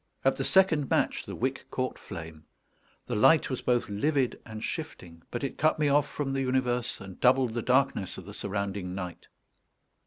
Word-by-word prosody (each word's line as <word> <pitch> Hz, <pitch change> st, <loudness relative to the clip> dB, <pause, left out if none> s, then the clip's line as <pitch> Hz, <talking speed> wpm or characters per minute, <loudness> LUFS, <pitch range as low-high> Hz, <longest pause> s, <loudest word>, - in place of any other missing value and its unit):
At -, -, +4 dB
the -, -, -2 dB
second 170 Hz, -7 st, +4 dB
match -, -, +1 dB
the -, -, -5 dB
wick 130 Hz, +2 st, -2 dB
caught 130 Hz, 0 st, -3 dB
flame. 80 Hz, -4 st, -9 dB, 0.6 s
The -, -, -4 dB
light 145 Hz, +8 st, +5 dB
was 130 Hz, -, -2 dB
both 120 Hz, -1 st, +1 dB
livid 130 Hz, +5 st, 0 dB
and 110 Hz, -1 st, -7 dB
shifting; 85 Hz, -2 st, -6 dB
but 120 Hz, -, -4 dB
it 140 Hz, -, -4 dB
cut 155 Hz, +1 st, +3 dB
me 150 Hz, -2 st, +2 dB
off 145 Hz, +1 st, +3 dB
from 135 Hz, -2 st, -3 dB
the 135 Hz, -, 0 dB
universe, 125 Hz, -2 st, 0 dB
and 95 Hz, -2 st, -11 dB
doubled 125 Hz, -2 st, +4 dB
the 120 Hz, -, -1 dB
darkness 125 Hz, -6 st, +1 dB
of -, -, -9 dB
the -, -, -9 dB
surrounding 100 Hz, -2 st, -3 dB
night. 90 Hz, -3 st, -6 dB
125 Hz, 185 wpm, -29 LUFS, 100-135 Hz, 0.6 s, light